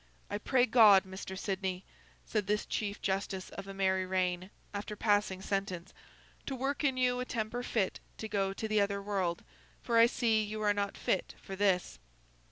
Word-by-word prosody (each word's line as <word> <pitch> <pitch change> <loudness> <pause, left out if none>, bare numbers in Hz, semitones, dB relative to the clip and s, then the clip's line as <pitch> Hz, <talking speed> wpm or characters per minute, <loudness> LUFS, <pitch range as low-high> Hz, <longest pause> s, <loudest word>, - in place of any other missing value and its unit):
'I 205 - -1
pray 250 +2 +3
God, 220 -5 +7
Mr. 190 0 -7
Sidney,' 190 -1 -2 0.4
said 210 -3 -1
this 210 0 +1
Chief 205 -1 -3
Justice 190 -1 -2
of 195 0 -8
a 195 - -6
merry 190 -1 +2
reign, 185 0 0 0.2
after 205 +1 -4
passing 205 -3 +1
sentence, 195 -3 -3 0.5
'to 270 - -2
work 270 +3 -2
in 270 -3 +2
you 250 -1 +2
a 250 - -2
temper 230 0 -2
fit 220 -6 -1 0.2
to 220 - -5
go 195 -2 0
to 220 +3 -4
the 215 -1 +3
other 200 0 0
world, 195 -4 -1 0.4
for 230 -1 +3
I 230 - +8
see 230 -3 +2
you 215 0 -4
are 205 0 +4
not 200 -1 -2
fit 190 - -1
for 195 - -7
this. 185 - +1
200 Hz, 180 wpm, -32 LUFS, 190-220 Hz, 0.5 s, I